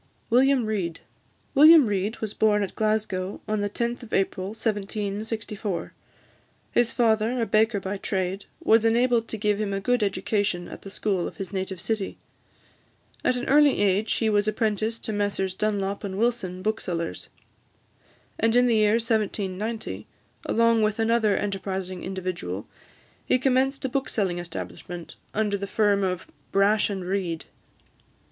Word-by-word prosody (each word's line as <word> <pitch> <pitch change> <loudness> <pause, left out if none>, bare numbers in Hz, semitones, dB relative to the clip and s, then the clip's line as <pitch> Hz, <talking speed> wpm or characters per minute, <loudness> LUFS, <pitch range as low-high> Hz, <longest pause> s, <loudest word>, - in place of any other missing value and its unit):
WILLIAM 260 0 +4
REID. 185 -6 -2 0.5
William 305 +1 +8
Reid 205 +1 -1
was 215 -2 -2
born 210 -1 +3
at 195 - -4
Glasgow 215 -3 -1
on 215 -1 0
the 205 - -1
10th 235 +4 -2
of 235 - -11
April 190 -1 0
1764. 210 -1 -3 0.8
His 240 -1 +3
father, 225 +1 +2
a 230 - +1
baker 220 -1 +2
by 195 +1 -4
trade, 190 0 -2 0.2
was 225 0 +5
enabled 230 0 +3
to 220 - -4
give 210 0 0
him 200 -2 -1
a 195 - -1
good 245 +4 +1
education 200 -2 0
at - - -9
the 195 - -9
school 195 -3 -1
of - - -9
his 195 0 -6
native 190 -1 -3
city. 215 +1 -2 1.1
At 250 - +2
an 245 - -3
early 290 0 +5
age 205 +2 +2
he 225 - 0
was 205 -1 +2
apprenticed 220 +1 -1
to 220 - -2
Messrs 205 -2 -1
Dunlop 200 0 -1
and 195 -2 -4
Wilson, 205 -6 -1
booksellers; 180 -6 -3 1.1
and 225 +1 +3
in 245 0 +6
the 235 -2 +3
year 210 0 +4
1790, 215 - -2 0.4
along 230 0 +3
with 215 -1 +1
another 225 -2 +2
enterprising 190 -2 -3
individual, 180 - -4 0.6
he - - +2
commenced 265 +1 +1
a - - 0
bookselling 210 -9 -1
establishment, 175 0 -7 0.2
under 205 -2 0
the 200 - -4
firm 205 -1 +2
of 185 -2 -1 0.3
"Brash 205 +2 +3
and 190 -3 -4
Reid." 180 -4 -2
210 Hz, 150 wpm, -25 LUFS, 195-225 Hz, 1.1 s, William